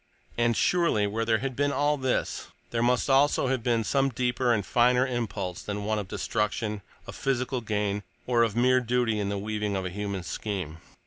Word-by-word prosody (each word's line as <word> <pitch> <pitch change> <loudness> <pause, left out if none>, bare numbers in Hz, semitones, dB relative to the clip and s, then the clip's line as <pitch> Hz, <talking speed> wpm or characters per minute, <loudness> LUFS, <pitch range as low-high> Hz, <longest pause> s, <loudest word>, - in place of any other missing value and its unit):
And, 115 -1 +2
surely, 170 -13 +2
where 110 +3 -1
there 115 -1 +3
had 130 +3 -4
been 145 +2 +1
all 145 +1 +2
this, 130 -3 -1 0.2
there 115 - 0
must 125 +1 +2
also 135 -1 +3
have 130 -2 0
been 115 -1 +1
some 135 +4 +2
deeper 125 0 0
and 105 -4 +1
finer 125 +4 +3
impulse 110 -8 -3
than 105 0 -4
one 110 0 0
of 100 - -5
destruction, 105 +1 -2 0.2
of - - -8
physical 130 -1 -1
gain, 105 -2 -1 0.2
or 120 -2 +2
of 115 -2 +2
mere 130 +2 +4
duty 120 -3 0
in 100 -1 -1
the 100 - -2
weaving 105 0 -2
of 95 -1 -2
a 90 - -3
human 100 -1 -4
scheme. 90 -5 -4
115 Hz, 195 wpm, -27 LUFS, 105-125 Hz, 0.2 s, mere